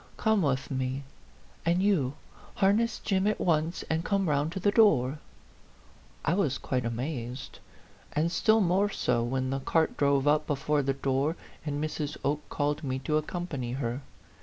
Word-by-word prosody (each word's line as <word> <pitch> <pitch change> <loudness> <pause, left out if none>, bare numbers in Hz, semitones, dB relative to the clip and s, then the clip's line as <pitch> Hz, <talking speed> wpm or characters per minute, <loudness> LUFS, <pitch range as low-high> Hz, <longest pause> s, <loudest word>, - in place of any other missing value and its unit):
Come 220 -2 +2
with 140 -3 0
me. 130 +1 -2 0.6
And 175 +3 +2
you, 150 -10 +2 0.4
harness 210 +4 +2
Jim 195 -1 0
at 215 - +1
once 160 0 +1
and 160 +1 0
come 195 -1 +1
round 145 +1 +1
to 190 - -3
the 205 +3 +2
door." 155 - +4 1.1
I 160 - +2
was 160 -8 +1
quite 125 -2 -2
amazed; 125 +1 -4 0.5
and 160 +3 +1
still 220 +5 +4
more 190 +2 +3
so 125 - 0
when 130 +2 -1
the 135 - -1
cart 160 +4 +1
drove 140 -1 +2
up 150 +1 +3
before 145 +1 +1
the 135 0 0
door, 135 +3 0 0.3
and 145 0 -1
Mrs. 150 -1 -3
Oke 145 +2 -1
called 145 +1 -1
me 130 -2 -1
to 150 +3 0
accompany 155 -6 -3
her. 130 0 -2
150 Hz, 160 wpm, -29 LUFS, 135-175 Hz, 1.1 s, door